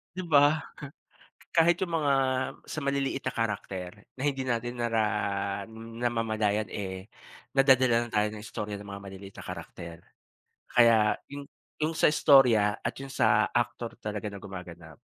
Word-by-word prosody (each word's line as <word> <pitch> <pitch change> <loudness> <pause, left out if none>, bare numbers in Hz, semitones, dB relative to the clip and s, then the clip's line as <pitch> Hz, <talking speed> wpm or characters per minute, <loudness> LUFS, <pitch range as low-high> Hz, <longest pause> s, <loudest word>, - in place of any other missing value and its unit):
'Di 185 - -4
ba? 145 -1 +5 1.0
Kahit 170 +1 +5
yung 170 -3 -2
mga 145 -2 +2 0.5
sa 155 - -5
maliliit 140 -1 -1
na - - -1
character, 100 -5 -3 0.3
na - - -4
hindi 135 -2 0
natin 120 -1 -2
nara 115 -1 +1 1.0
namamalayan, 110 -3 0
eh, 95 -1 -5 0.5
nadadala 130 -3 +4
na - - -12
tayo 105 0 +3
ng 105 - -8
istorya 105 -1 -5
ng 100 - -11
mga 100 0 -7
maliliit 95 0 -10
na - - -9
karakter. 85 -1 -8 0.7
Kaya 115 -3 +5 0.2
yung 140 0 -7 0.3
yung 155 +2 -1
sa 160 - +4
istorya, 125 -9 +5
at - - -2
yung 135 0 -8
sa 110 -4 +3
aktor 120 -1 -1
talaga 105 0 -4
na 100 -2 -7
gumaganap. 85 -5 -10
115 Hz, 145 wpm, -28 LUFS, 100-135 Hz, 1.0 s, ba